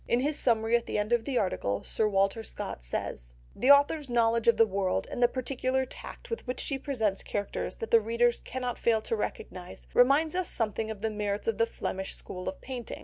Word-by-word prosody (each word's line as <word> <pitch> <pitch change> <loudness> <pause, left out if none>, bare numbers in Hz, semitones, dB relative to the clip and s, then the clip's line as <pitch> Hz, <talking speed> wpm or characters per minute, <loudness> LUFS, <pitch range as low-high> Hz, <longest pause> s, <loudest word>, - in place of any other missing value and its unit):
In 240 - +2
his 295 +2 0
summary 225 -1 +3
at 235 - 0
the - - -1
end 210 +3 0
of 235 -1 +2
the 270 -3 -1
article, 100 - -1
Sir 220 - +1
Walter 195 +2 +1
Scott 220 - -6
says— - - -4 0.2
"The 260 - +1
author's 285 0 +5
knowledge 230 -1 +2
of 235 - +6
the 225 - +7
world 190 - -1
and - - -4
the 240 - +7
peculiar 260 +1 -1
tact - - -11
with 460 - -4
which 250 - -3
she 275 -2 -1
presents 220 -9 -1
characters 205 -1 -3
that 225 - -6
the 230 - +7
reader 235 +2 +3
cannot 250 -1 -4
fail 225 -2 +2
to 225 - -1
recognise, 185 -4 -6
reminds 280 +6 +4
us 365 -1 -1
something 220 -1 -1
of 215 -1 -7
the 220 - 0
merits 205 -1 -2
of 225 -1 0
the 230 - +4
Flemish 190 -3 -4
school 185 0 -5
of 285 - -8
painting. 250 -3 -6
230 Hz, 215 wpm, -29 LUFS, 210-255 Hz, 0.2 s, the